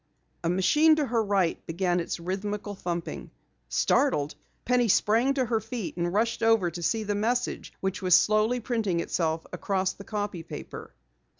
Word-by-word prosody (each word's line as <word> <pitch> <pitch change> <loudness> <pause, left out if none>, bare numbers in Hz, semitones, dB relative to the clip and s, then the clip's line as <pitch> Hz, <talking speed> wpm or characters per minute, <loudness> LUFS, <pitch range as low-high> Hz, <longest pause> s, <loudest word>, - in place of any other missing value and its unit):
A 165 - +1
machine 300 - +4
to 305 -2 0
her 230 -3 +1
right 195 -5 0
began 175 +1 0
its 170 - -3
rhythmical 205 +4 -4
thumping. 175 -3 -5 0.4
Startled, 145 - +2 0.3
Penny 250 -1 +3
sprang 230 +6 +3
to 260 -2 +1
her 225 -1 0
feet 220 -2 -5
and 175 0 -1
rushed 225 +4 0
over 225 -6 +3
to 175 - -7
see 220 +6 0
the 205 0 -1
message 235 +4 -1
which 190 -1 -2
was 180 -2 +5
slowly 215 +3 +3
printing 225 -7 -1
itself 165 -1 -1
across 190 -1 -1
the 200 - -11
copy 205 -4 -4
paper. 160 -2 -9
205 Hz, 165 wpm, -27 LUFS, 175-225 Hz, 0.4 s, was